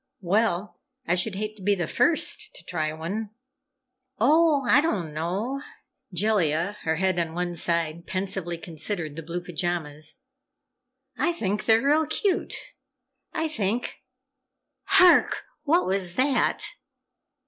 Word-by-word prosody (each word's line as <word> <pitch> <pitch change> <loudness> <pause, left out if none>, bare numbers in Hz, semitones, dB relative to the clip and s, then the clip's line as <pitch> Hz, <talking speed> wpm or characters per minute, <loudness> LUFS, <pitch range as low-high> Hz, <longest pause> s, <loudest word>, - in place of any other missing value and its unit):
"Well, 205 +1 0 0.2
I - - +1
should 185 +3 +2
hate 215 +2 -4
to - - -14
be 205 +2 +2
the 175 -3 -2
first 335 - +2
to - - -8
try 155 -3 -1
one!" 190 +8 -4 0.9
"Oh, 295 +3 +4
I 290 - +6
don't 190 - -1
know," 195 - -2 0.5
Jellia, 180 -2 +1
her 160 0 0
head 185 +1 +1
on 165 -1 -2
one 175 0 -2
side, 170 0 -1
pensively 185 -2 -3
considered 165 -1 -4
the 165 - -5
blue 170 +2 -5
pajamas. 165 -4 -3 1.0
"I 340 +5 +2
think 210 - -2
they're 225 +1 +4
real 300 +2 +3
cute. 370 +4 0 0.8
I 320 -1 -1
think 235 -5 -2 0.9
HARK! 360 -1 +5 0.2
What 330 +4 +3
was 185 -2 0
that?" 265 +3 +1
190 Hz, 125 wpm, -26 LUFS, 170-235 Hz, 1.0 s, I